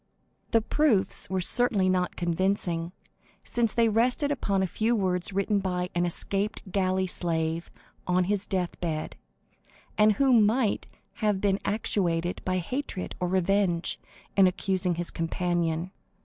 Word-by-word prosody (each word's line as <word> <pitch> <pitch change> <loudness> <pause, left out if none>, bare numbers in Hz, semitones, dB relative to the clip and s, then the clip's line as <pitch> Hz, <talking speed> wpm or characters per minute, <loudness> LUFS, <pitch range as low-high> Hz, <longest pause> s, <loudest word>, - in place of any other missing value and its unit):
The 225 -1 +3
proofs 230 -10 +2
were 190 0 0
certainly 210 -1 +2
not 185 -1 0
convincing, 175 -1 -1 0.5
since 235 -2 +1
they 230 -1 +3
rested 245 +6 +2
upon 200 -8 0
a - - +2
few 220 +6 0
words 185 -2 -1
written 200 +1 +1
by 180 -1 -2
an 175 0 +1
escaped 200 +3 -3
galley 185 0 +1
slave 165 -2 -1 0.4
on 180 0 +3
his 200 +2 -1
death 185 -3 -2
bed, 160 -3 -3 0.8
and 210 0 +6
who 270 +4 +3
might 220 0 +3 0.3
have 210 -3 +2
been 195 0 +1
actuated 175 -5 -1
by 185 0 0
hatred 190 +2 -4
or 180 - 0
revenge 185 -1 +1 0.4
in 195 -1 +6
accusing 185 -1 0
his 175 0 -2
companion. 170 0 -1
190 Hz, 135 wpm, -27 LUFS, 175-210 Hz, 0.8 s, and